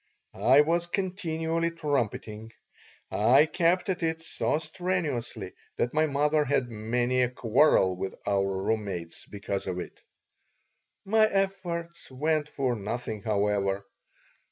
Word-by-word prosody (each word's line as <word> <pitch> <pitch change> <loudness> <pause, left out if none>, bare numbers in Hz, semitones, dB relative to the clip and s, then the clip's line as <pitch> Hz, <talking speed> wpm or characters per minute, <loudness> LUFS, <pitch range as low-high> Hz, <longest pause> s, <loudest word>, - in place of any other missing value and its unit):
I 135 +3 +5
was 170 +3 +1
continually 170 -3 -1
trumpeting. 120 -8 -3 0.6
I 125 +8 +5
kept 175 +2 +1
at 185 -2 -1
it 160 0 -1
so 155 - 0
strenuously 155 - -3 0.2
that 120 - -1
my 155 +1 +3
mother 150 +1 +2
had 130 -3 0
many 120 +3 0
a 125 - +2
quarrel 120 -5 +3
with 95 +1 -4
our 95 -1 0
room 110 0 0
mates 85 -4 -6
because 100 -1 -4
of 90 - -2
it - - -8 1.0
My 215 +2 +4
efforts 190 -4 -2
went 150 +3 0
for 130 -4 -1
nothing, 110 0 -4
however. 100 -1 0
135 Hz, 125 wpm, -28 LUFS, 105-165 Hz, 1.0 s, I